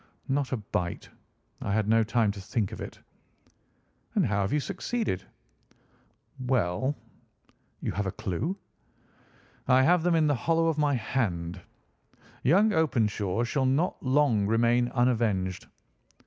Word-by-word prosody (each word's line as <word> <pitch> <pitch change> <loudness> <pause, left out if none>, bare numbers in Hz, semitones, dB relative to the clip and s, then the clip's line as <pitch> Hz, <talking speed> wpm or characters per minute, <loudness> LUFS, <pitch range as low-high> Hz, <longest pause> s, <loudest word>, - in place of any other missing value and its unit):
"Not 140 0 0
a 130 - 0
bite. 90 -4 -4 0.5
I 100 - -2
had 110 -1 +1
no 115 +1 +4
time 110 -1 +1
to 100 -1 -8
think 100 +1 -2
of - - -7
it." - - -8 1.2
"And 200 -6 +3
how 100 -3 0
have 100 - -1
you 150 - +2
succeeded?" 200 - -2 1.2
"Well." 130 +1 0 0.9
"You - - -2
have 100 0 -2
a - - -1
clue?" 110 - -3 1.1
"I 130 0 +5
have 175 +4 +4
them 175 0 +2
in 160 -1 +3
the 145 - +3
hollow 165 +6 +1
of 160 -2 +1
my 145 -2 +2
hand. 90 -8 -2 0.8
Young 200 - +4
Openshaw 115 - +1
shall 130 +2 0
not 145 +7 0
long 130 -7 +2
remain 120 +2 +3
unavenged. 110 -8 0
120 Hz, 135 wpm, -28 LUFS, 105-145 Hz, 1.2 s, I